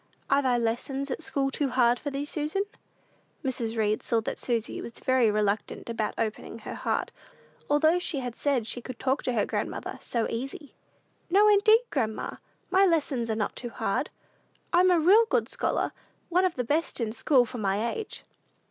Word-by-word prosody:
"Are 280 +1 +5
thy 255 -3 +2
lessons 255 +4 -2
at 260 - -3
school 275 -3 -1
too 280 0 0
hard 245 -1 +3
for 290 - -3
thee, 280 +1 -3
Susan?" 305 +6 -1 0.8
Mrs. 235 -3 -2
Read 215 -1 +1
saw 230 - +1
that - - -4
Susy 235 -2 -2
was 235 - -7
very 255 -3 +2
reluctant 210 +2 -1
about 220 -2 -2
opening 220 0 -3
her 225 - -7
heart, - - -2 0.6
although 315 +4 +4
she 345 -4 -1
had 250 -3 -3
said 275 -6 0
she 240 +2 -4
could 255 0 -8
talk 265 +2 0
to 250 - -1
her 220 - +2
grandmother - - -4
"so 230 -2 -1
easy." 270 +5 -5 0.6
"No, 405 +4 +5
indeed, 430 +2 +6
grandma; 220 -6 -2 0.3
my 380 +1 +5
lessons 290 -10 +1
are 220 - +1
not 215 -2 -2
too 240 - -5
hard. - - -1 0.6
I'm 360 +2 +6
a 355 -2 +5
real 400 +8 +6
good 470 - +2
scholar - - -1 0.4
one 360 +2 +3
of 365 - 0
the 250 - -1
best 300 +7 -1
in 225 -2 -1
school 245 +2 +3
for 240 +1 -7
my 205 +3 0
age." 440 - -6
260 Hz, 185 wpm, -27 LUFS, 230-310 Hz, 0.8 s, indeed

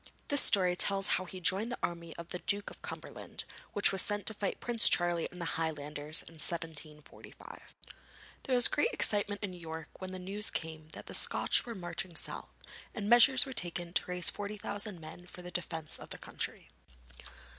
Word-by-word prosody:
This 285 -1 +8
story 180 -3 +6
tells 195 +1 +4 0.2
how - - -6
he 185 +1 -8
joined 195 +6 +1
the 245 - -3
army 170 -1 -4
of 170 0 -9
the 180 - -4
Duke 200 +2 +1
of - - -13
Cumberland, - - -8 0.3
which 205 - +4
was 195 -1 +4
sent 205 -1 0
to 220 - +2
fight 205 -2 -3
Prince 235 -2 +6
Charlie 175 -1 +1
and 180 - -12
the 170 - -4 0.2
Highlanders 150 -1 -3
in 165 -1 -12
1745. 155 -3 -5 0.8
There 260 - 0
was 245 - +8
great 465 - +1
excitement 205 -1 +1
in 195 -3 -4
York 160 -2 -8
when 185 0 -5
the 185 - -6
news 195 +3 0
came 160 -1 -5
that - - -9
the - - -9
Scotch - - +1
were 230 - -5
marching 175 -1 -6
south, - - -5 0.5
and 210 -3 -4
measures 250 +2 +7
were 265 - -7
taken 175 -4 -1
to - - +1
raise 180 -1 -1
4,000 205 -1 -4
men 165 +3 -11
for 180 - -11
the 180 - -8
defence 160 -3 -3
of - - -11
the - - -7
country. - - -7
180 Hz, 190 wpm, -32 LUFS, 165-205 Hz, 0.8 s, This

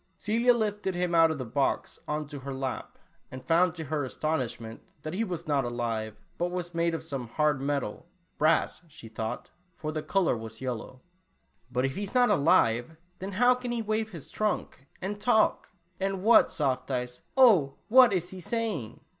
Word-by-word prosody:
Celia 235 +3 +3
lifted 210 -4 -1
him 175 -1 -1
out 165 -1 +6
of 160 - -2
the 130 - -4
box 135 +4 -1
on 150 0 -2
to 145 0 -8
her 135 0 -6
lap, 130 -1 -4 0.3
and 130 0 -9
found 170 +2 +3
to 165 - -5
her 150 0 -2
aston 155 +4 -1
ishment, 115 -2 -6 0.2
that 155 - -5
he 210 +5 0
was 180 -6 -4
not 145 -2 +2
alive, 115 -3 -3 0.2
but 175 +1 0
was 175 -1 -4
made 170 0 +1
of 165 - -5
some 135 -6 -5
hard 150 +3 +1
metal 140 -1 -2
— - - -43
brass, 155 +3 +2
she 145 -7 -13
thought, 110 0 -5 0.2
for 155 -1 -4
the 155 0 -3
color 190 -3 +1
was 110 -1 -8
yellow. 130 0 -5 0.3
" - - -39
But, 125 +1 +1
if 135 - -2
he - - -4
is 205 +4 -5
not 245 -3 +5
alive, 140 - +3 0.2
then 195 +2 -5
how 245 +5 +5
can 250 -1 -5
he 235 -1 -1
wave 215 +1 -1
his 165 -8 -10
trunk 210 -9 -2 0.2
and 205 +2 -4
talk? 220 -2 +2 0.3
And 195 -1 -2
what, 230 +2 +6
Soft 130 -4 -1
Eyes, 125 -1 -3 0.2
oh, 195 - +6
what 250 0 +7
is 180 -2 -1
he 190 - -8
saying?" 200 - -3
160 Hz, 195 wpm, -28 LUFS, 130-195 Hz, 0.3 s, what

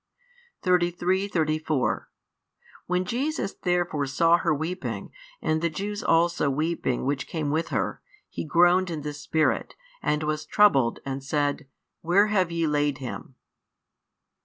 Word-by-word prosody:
33, 180 +1 +1
34 155 - 0 0.8
When 180 +1 0
Jesus 265 - -2
therefore 175 -5 -1
saw 165 +5 +4
her 170 - 0
weeping, 160 +5 -3 0.3
and 155 0 +1
the 170 - +1
Jews 205 +6 -4
also 165 -3 +2
weeping 150 -3 -1
which 140 +1 -1
came 155 -3 -2
with 160 +2 0
her, - - -2 0.3
He - - -5
groaned 175 +3 +4
in 160 -3 -4
the 150 0 -4
spirit, 155 +2 0 0.3
and 150 +1 0
was 155 0 -2
troubled, 140 - +4
and 135 0 -4
said, 145 0 -1 0.3
Where 195 +6 +3
have 185 -4 +2
ye 165 -1 0
laid 145 -2 +1
him? 130 -1 -7
160 Hz, 135 wpm, -26 LUFS, 145-180 Hz, 0.8 s, saw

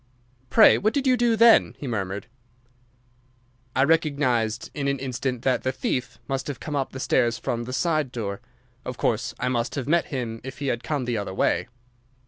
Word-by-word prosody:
"Pray, 220 - +7
what 215 +5 +1
did 280 -1 0
you 255 -1 +5
do 240 -1 +2
then?" 230 0 +6
he - - -7
murmured. 100 -4 -3 1.5
"I 130 - +4
recognised 140 -8 +1
in 140 -2 -2
an 140 0 +1
instant 130 -1 -3
that 130 -1 +2
the 130 - 0
thief 125 -1 -3
must 135 0 -2
have 145 -4 -5
come 150 - -5
up 135 -2 -1
the 130 - -7
stairs 120 -3 +2
from 120 0 -3
the 125 - -6
side 155 -1 0
door. 105 -3 -4 0.4
Of 125 -2 -6
course 120 +3 -1
I 125 - -1
must 120 0 -1
have 140 -3 -3
met 170 +3 +3
him 120 -5 -4
if 130 0 -8
he 140 0 -2
had 120 - -1
come 145 -5 -2
the 120 -3 -1
other 100 -2 -5
way." - - +1
130 Hz, 195 wpm, -25 LUFS, 120-145 Hz, 1.5 s, Pray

